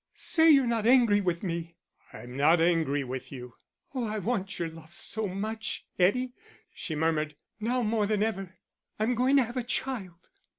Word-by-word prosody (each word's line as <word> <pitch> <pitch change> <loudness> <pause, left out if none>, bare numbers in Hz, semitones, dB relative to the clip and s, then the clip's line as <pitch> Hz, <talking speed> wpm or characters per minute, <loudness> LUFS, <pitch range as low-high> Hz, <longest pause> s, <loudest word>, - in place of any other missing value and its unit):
"Say 325 0 +4
you're 275 -4 +6
not 230 -2 0
angry 235 -5 +5
with 175 -2 -1
me." 170 -2 -4 0.4
"I'm 125 +1 -10
not 155 +5 +4
angry 160 -4 +2
with 130 0 -6
you." 125 -3 -9 0.4
"Oh, 250 -4 -2
I 215 0 -3
want 195 -2 -2
your 170 - -2
love 165 +1 -12
so 220 -1 -1
much, 215 +4 -4
Eddie," 245 +8 +2 0.4
she 160 - -5
murmured. 155 -1 0 0.2
"Now 245 +3 0
more 215 -1 +1
than 210 -1 +1
ever.... 195 -4 -3 0.4
I'm 220 +3 +1
going 255 +3 +2
to 270 - +5
have 240 +2 -7
a 250 - 0
child." 215 -8 -4
205 Hz, 175 wpm, -28 LUFS, 165-235 Hz, 0.4 s, you're